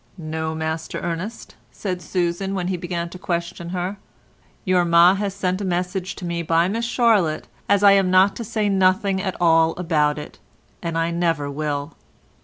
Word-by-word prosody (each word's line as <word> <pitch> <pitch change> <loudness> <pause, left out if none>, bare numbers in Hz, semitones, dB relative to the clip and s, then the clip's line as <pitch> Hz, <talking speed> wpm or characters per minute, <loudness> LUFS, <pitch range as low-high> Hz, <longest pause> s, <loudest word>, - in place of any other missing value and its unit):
"No, 160 -1 -4
Master 160 0 -3
Ernest," 175 +7 -5 0.2
said 180 -3 -4
Susan, 180 +2 -2
when 180 -1 -2
he 190 - 0
began 170 -1 -3
to 180 - -10
question 170 -1 -3
her, 180 +2 -3 0.7
"your 185 -2 +3
ma 170 +1 +6
has 200 0 -2
sent 185 0 -1
a - - -2
message 180 +1 -2
to 180 - -7
me 170 0 -2
by 165 +1 +2
Miss 225 +4 -2
Charlotte 225 -10 +2 0.2
as 200 0 +3
I 200 - +8
am 195 -2 +4
not 185 +2 +4
to 235 - -4
say 215 -1 -1
nothing 190 0 +2
at 190 -1 -4
all 165 -1 +4
about 150 -4 +1
it, 150 - -9 0.4
and 165 -1 -3
I 165 +1 0
never 165 -4 0
will." 145 +1 -3
175 Hz, 180 wpm, -22 LUFS, 165-190 Hz, 0.7 s, I